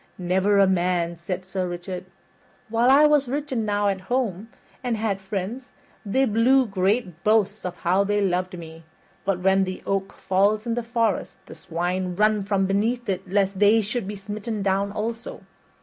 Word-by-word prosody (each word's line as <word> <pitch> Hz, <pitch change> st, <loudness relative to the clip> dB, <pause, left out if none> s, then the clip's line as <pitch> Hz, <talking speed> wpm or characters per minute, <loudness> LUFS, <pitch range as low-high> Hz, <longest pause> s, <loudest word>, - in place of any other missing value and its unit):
"Never 190 Hz, +3 st, +2 dB
a 200 Hz, -, +6 dB
man," 175 Hz, -2 st, +1 dB
said 180 Hz, +2 st, -5 dB
Sir 190 Hz, -1 st, -3 dB
Richard. 175 Hz, +1 st, -6 dB, 0.6 s
"While 230 Hz, +3 st, +3 dB
I 285 Hz, +3 st, +7 dB
was 295 Hz, -4 st, +3 dB
rich 290 Hz, +2 st, -3 dB
enow 205 Hz, -4 st, 0 dB
at 195 Hz, -1 st, -1 dB
home, 225 Hz, -2 st, -2 dB, 0.3 s
and 245 Hz, -3 st, -1 dB
had 210 Hz, -3 st, -1 dB
friends, 200 Hz, +6 st, -5 dB, 0.3 s
they 260 Hz, +7 st, +2 dB
blew 250 Hz, +4 st, +4 dB
great 195 Hz, -3 st, -1 dB
boasts 210 Hz, -1 st, +2 dB
of 175 Hz, -1 st, -4 dB
how 185 Hz, +3 st, +3 dB
they 205 Hz, +1 st, 0 dB
loved 185 Hz, -1 st, -1 dB
me. 165 Hz, -1 st, -10 dB, 0.4 s
But 190 Hz, -2 st, 0 dB
when 190 Hz, +1 st, +3 dB
the 185 Hz, 0 st, -5 dB
oak 195 Hz, 0 st, -1 dB
falls 205 Hz, +3 st, +1 dB
in 235 Hz, -, -1 dB
the 240 Hz, -, -1 dB
forest 230 Hz, -3 st, -1 dB
the -, -, -11 dB
swine 180 Hz, +2 st, -3 dB
run 210 Hz, +1 st, +3 dB
from 195 Hz, -1 st, 0 dB
beneath 220 Hz, +6 st, 0 dB
it 190 Hz, -1 st, -3 dB
lest 195 Hz, 0 st, +1 dB
they 210 Hz, +2 st, +5 dB
should 215 Hz, 0 st, -2 dB
be 205 Hz, -, -4 dB
smitten 210 Hz, +1 st, -5 dB
down 195 Hz, +1 st, +1 dB
also. 225 Hz, +3 st, -5 dB
200 Hz, 175 wpm, -24 LUFS, 185-225 Hz, 0.6 s, I